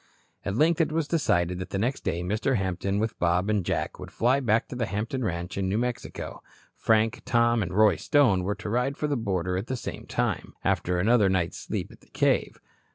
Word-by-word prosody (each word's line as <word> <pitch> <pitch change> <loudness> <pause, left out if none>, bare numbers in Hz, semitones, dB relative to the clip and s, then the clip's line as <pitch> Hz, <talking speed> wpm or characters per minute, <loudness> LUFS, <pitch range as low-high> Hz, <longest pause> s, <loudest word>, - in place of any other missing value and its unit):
At 100 - -2
length 165 +6 +3
it 155 - +1
was 160 -1 0
decided 90 - +1
that 90 - -5
the - - -2
next 120 +7 -1
day 90 -2 -1
Mr. 110 +8 0
Hampton, 95 +1 -1
with 110 +2 -2
Bob 90 +4 +2
and 105 -3 +1
Jack, - - -2
would - - -8
fly 125 +4 +2
back 115 -4 +1
to - - -6
the 120 -3 -1
Hampton 115 +6 -2
ranch 90 -1 -3
in 95 -1 0
New 100 - 0
Mexico. 125 +1 -4 0.3
Frank, 110 +3 +2
Tom 120 -2 +3
and 90 -2 -2
Roy 105 -2 +4
Stone 125 - +3
were 100 +3 -1
to 105 - -8
ride 125 +6 0
for - - -2
the 145 -1 0
border 90 -6 -1
at 100 +6 -4
the 130 - -2
same - - -7
time, - - -2
after 90 0 +1
another 105 +2 +4
night's 90 -3 0
sleep - - -4
at - - -17
the - - -23
cave. - - +1
110 Hz, 220 wpm, -27 LUFS, 95-125 Hz, 0.3 s, Roy